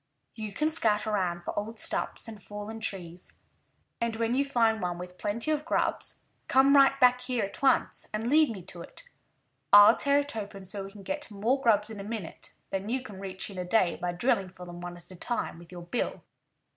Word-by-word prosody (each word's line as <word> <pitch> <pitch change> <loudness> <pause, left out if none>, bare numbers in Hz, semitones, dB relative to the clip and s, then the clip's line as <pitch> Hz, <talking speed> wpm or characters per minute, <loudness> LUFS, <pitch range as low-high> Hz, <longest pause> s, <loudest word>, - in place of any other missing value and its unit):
"You 215 -2 -5
can 305 +10 0
scout 215 -9 +2
around 185 -5 -1
for - - -4
old 220 +2 -6
stumps - - -1
and 215 -2 -9
fallen 210 +2 -7
trees. 180 -4 -4 0.6
And 235 -1 0
when 230 +1 0
you 275 +2 +3
find 230 -5 +2
one 175 -1 -2
with 180 +1 -9
plenty 230 +8 -1
of 300 -1 0
grubs, 320 - -1 0.3
come 270 +2 +5
right 275 0 +6
back 250 -1 +5
here 250 -4 -1
at 195 - -10
once 275 - +2
and 215 +1 -3
lead 305 +4 +4
me 200 -6 -6
to 175 -1 -9
it. - - -11 0.7
I'll 205 0 +9
tear 280 0 +3
it 285 -3 -1
open 200 -2 -6
so 195 +1 -2
we 195 - -9
can 200 -1 -12
get 295 +4 -3
more 225 +6 0
grubs 215 -3 +3
in 215 - -7
a - - -5
minute 210 -5 -6 0.2
than 195 +2 -3
you 255 +2 -1
can 205 -6 -10
reach 190 +1 -3
in 190 - -7
a - - -1
day 180 -1 +2
by 175 0 -2
drilling 190 0 +1
for 180 -1 -11
them 175 0 -9
one 175 0 -7
at 175 - -16
a - - -10
time 210 -3 -3
with 170 0 -15
your 175 -1 -8
bill. 175 +8 -3
210 Hz, 220 wpm, -29 LUFS, 185-245 Hz, 0.7 s, I'll